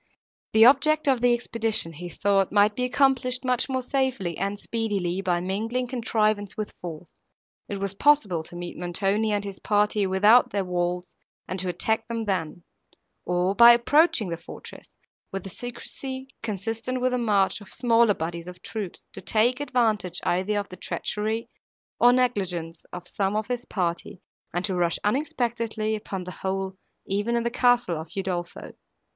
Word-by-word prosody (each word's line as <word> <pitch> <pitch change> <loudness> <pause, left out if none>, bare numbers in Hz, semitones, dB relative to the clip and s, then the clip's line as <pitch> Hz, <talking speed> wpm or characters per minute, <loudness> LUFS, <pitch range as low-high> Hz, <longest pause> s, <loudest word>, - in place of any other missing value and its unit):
The 220 +1 +7
object 300 +4 +5
of 260 -3 +3
the 245 0 +4
expedition, 225 -7 0
he 175 +3 -7
thought, 195 +2 +1
might 205 0 +4
be 250 - 0
accomplished 255 -1 +1
much 255 +1 +1
more 260 -1 -1
safely 255 - -1
and 200 +4 -2
speedily 200 -5 -2
by 180 -2 +1
mingling 225 +7 -2
contrivance 215 -4 0
with 215 -1 -4
force. 170 -1 -8 0.6
It 205 - -3
was 195 0 -3
possible 205 - +3
to 175 - -11
meet 175 0 -6
Montoni 195 +5 0
and 205 -1 0
his 200 -1 -7
party, 210 -1 +1
without 205 +6 +5
their 200 -2 -1
walls, 180 0 -2 0.3
and 185 - -3
to 185 0 -2
attack 220 +5 0
them 230 -1 -3
then; 175 -4 -2 0.6
or, 180 +2 +1
by 235 +3 +9
approaching 240 - +3
the 170 -1 -4
fortress, 170 - -11 0.4
with 195 -1 -4
the 195 - -7
secrecy, 260 +3 -6
consistent 225 +4 -3
with 255 0 +1
the 250 - 0
march 210 -3 +2
of 205 - -13
smaller 230 -3 +3
bodies 170 +1 -5
of 180 0 -10
troops, 210 -5 -6
to 195 - -9
take 230 +6 +2
advantage 220 -10 0
either 190 +4 0
of 200 -1 -3
the 185 - -10
treachery, 215 +5 -3 0.5
or 245 - +7
negligence 190 -10 -1
of 180 0 -8
some 195 +1 -1
of 215 0 0
his 245 +2 -3
party, 175 -1 -3 0.3
and 175 +2 -1
to 195 - -2
rush 175 -1 +1
unexpectedly 230 -3 -1
upon 195 -3 -5
the 180 - -7
whole 190 0 -2 0.3
even 205 +4 -1
in 235 - +1
the 235 - -1
castle 245 -9 +2
of 160 - -11
Udolpho. 180 -3 -4
210 Hz, 165 wpm, -25 LUFS, 185-240 Hz, 0.6 s, by